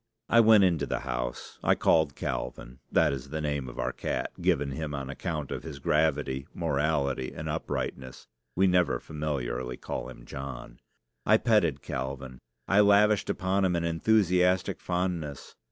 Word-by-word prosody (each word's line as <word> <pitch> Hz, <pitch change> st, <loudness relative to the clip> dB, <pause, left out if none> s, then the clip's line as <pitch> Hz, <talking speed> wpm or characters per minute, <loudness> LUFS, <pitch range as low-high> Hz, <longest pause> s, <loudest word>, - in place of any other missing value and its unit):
I 115 Hz, -, +6 dB
went 110 Hz, -3 st, +7 dB
into 90 Hz, -4 st, +2 dB
the -, -, -2 dB
house. -, -, -4 dB
I -, -, +4 dB
called 80 Hz, -4 st, +3 dB
Calvin 65 Hz, +1 st, -5 dB
(that -, -, +3 dB
is 70 Hz, 0 st, -6 dB
the 80 Hz, +2 st, -3 dB
name 70 Hz, -4 st, -2 dB
of -, -, -11 dB
our 60 Hz, +1 st, -1 dB
cat, -, -, -3 dB
given 70 Hz, -2 st, +1 dB
him 75 Hz, +1 st, -4 dB
on 70 Hz, -1 st, -4 dB
account 75 Hz, -1 st, -4 dB
of -, -, -3 dB
his 75 Hz, -2 st, -8 dB
gravity, 70 Hz, -2 st, 0 dB
morality, 70 Hz, -4 st, 0 dB
and -, -, -5 dB
uprightness. 65 Hz, -1 st, -4 dB, 0.3 s
We 95 Hz, -, +4 dB
never 90 Hz, -9 st, +3 dB
familiarly 65 Hz, -5 st, -3 dB
call -, -, -5 dB
him -, -, -12 dB
John). 65 Hz, -3 st, -8 dB, 0.4 s
I 110 Hz, -, +5 dB
petted 105 Hz, -, +2 dB
Calvin. 65 Hz, -1 st, -5 dB, 0.3 s
I 100 Hz, -, +4 dB
lavished 105 Hz, 0 st, +5 dB
upon 95 Hz, 0 st, 0 dB
him 90 Hz, -2 st, +2 dB
an 85 Hz, -, 0 dB
enthusiastic 90 Hz, +1 st, +2 dB
fondness. 90 Hz, -6 st, -3 dB
75 Hz, 155 wpm, -28 LUFS, 65-90 Hz, 0.4 s, went